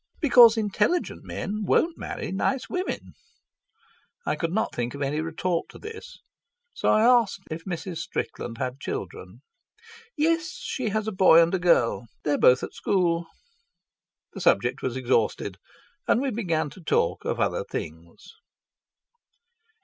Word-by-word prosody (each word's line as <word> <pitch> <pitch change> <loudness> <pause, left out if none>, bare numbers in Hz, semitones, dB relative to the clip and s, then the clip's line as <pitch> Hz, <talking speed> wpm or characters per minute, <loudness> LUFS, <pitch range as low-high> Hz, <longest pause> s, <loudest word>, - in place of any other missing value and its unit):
"Because 240 -7 +7
intelligent 215 - 0
men 215 +1 -4
won't 325 - +2
marry - - -5
nice 250 +7 -1
women." 365 +1 -4 1.1
I - - 0
could 165 -1 -2
not 220 +5 -1
think 120 +2 -3
of 140 - -3
any 145 +3 -1
retort 165 +2 -2
to - - -12
this, 435 +1 -10 0.6
so - - -1
I 215 - +4
asked 235 -5 +4
if 160 +1 -6
Mrs. 175 -1 -5
Strickland 115 -1 -5
had 130 +2 -4
children. - - -7 0.7
"Yes; 330 +3 +1
she 270 - -3
has 215 +1 -2
a - - -1
boy 185 -4 +6
and 165 - -1
a 190 - +1
girl. 125 -9 +2 0.2
They're 145 -1 0
both 125 0 +5
at - - -5
school." 170 -3 0 1.1
The - - -7
subject - - +2
was 130 0 -2
exhausted, 115 -6 0 0.5
and - - +3
we 270 0 -1
began 165 - -1
to 185 - -13
talk 160 - 0
of - - -2
other - - 0
things. 80 - -8
185 Hz, 145 wpm, -25 LUFS, 150-235 Hz, 1.1 s, Because